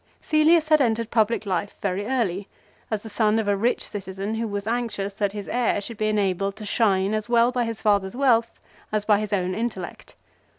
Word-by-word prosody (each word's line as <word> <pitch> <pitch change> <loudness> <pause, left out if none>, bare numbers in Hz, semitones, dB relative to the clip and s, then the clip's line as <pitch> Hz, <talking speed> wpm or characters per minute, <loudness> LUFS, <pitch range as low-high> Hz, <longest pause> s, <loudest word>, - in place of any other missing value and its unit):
Cselius 310 +1 +4
had 305 -2 +5
entered 230 -2 0
public 220 -1 +1
life 190 0 -2
very 200 +1 -2
early, 205 -7 -1 0.4
as 215 -2 -2
the - - -8
son 215 0 +2
of 220 -2 -1
a 205 - +3
rich 230 +5 0
citizen 195 +1 -5
who 225 +1 -2
was 205 -1 -4
anxious 225 -4 -2
that 200 0 -1
his 205 -1 -6
heir 245 -4 +1
should 220 +2 -7
be 215 - 0
enabled 195 -2 0
to 215 - -8
shine 200 -2 +2
as 215 +1 -2
well 235 0 +4
by 250 -1 0
his 230 -1 -5
father's 200 -2 +2
wealth 235 -4 +2 0.3
as 215 -1 -1
by 210 -1 +4
his 215 -1 -4
own 185 -2 0
intellect. 200 -4 -5
215 Hz, 205 wpm, -24 LUFS, 200-230 Hz, 0.4 s, had